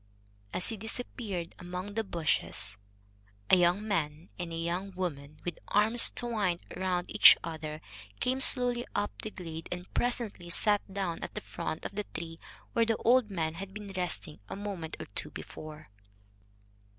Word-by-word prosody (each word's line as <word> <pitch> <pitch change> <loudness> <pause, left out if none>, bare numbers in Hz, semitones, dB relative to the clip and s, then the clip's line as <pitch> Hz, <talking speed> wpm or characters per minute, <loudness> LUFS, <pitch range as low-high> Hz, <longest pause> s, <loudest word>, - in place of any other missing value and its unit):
As 180 - +1
he 225 - -2
disappeared 215 -5 -4
among 180 +3 -5
the 225 +1 0
bushes, 100 - 0 0.7
a - - +10
young 180 +4 +3
man 160 -4 -1
and 175 -1 -3
a - - -3
young 175 +4 -1
woman, 150 -5 -4
with 175 -3 -3
arms 220 +3 +5
twined 210 -8 0
round 180 -1 -1
each 210 - +10
other, 155 -2 -5 0.4
came 255 +1 +1
slowly 245 -2 +5
up 205 0 +1
the 215 - -4
glade 165 -5 -7
and 180 +1 -5
presently 230 -8 -1
sat 205 +4 +3
down 190 -4 -2
at - - -6
the - - -1
foot 155 - -4
of - - -4
the 210 +1 -2
tree 165 0 -5 0.3
where 230 - +4
the 225 -1 +2
old 245 -2 +4
man 160 -5 -1
had 190 +3 -7
been 205 -2 -7
resting 180 -3 -3
a - - -4
moment 195 -5 -4
or - - -5
two - - -2
before. 155 -2 -9
185 Hz, 160 wpm, -31 LUFS, 165-210 Hz, 0.7 s, a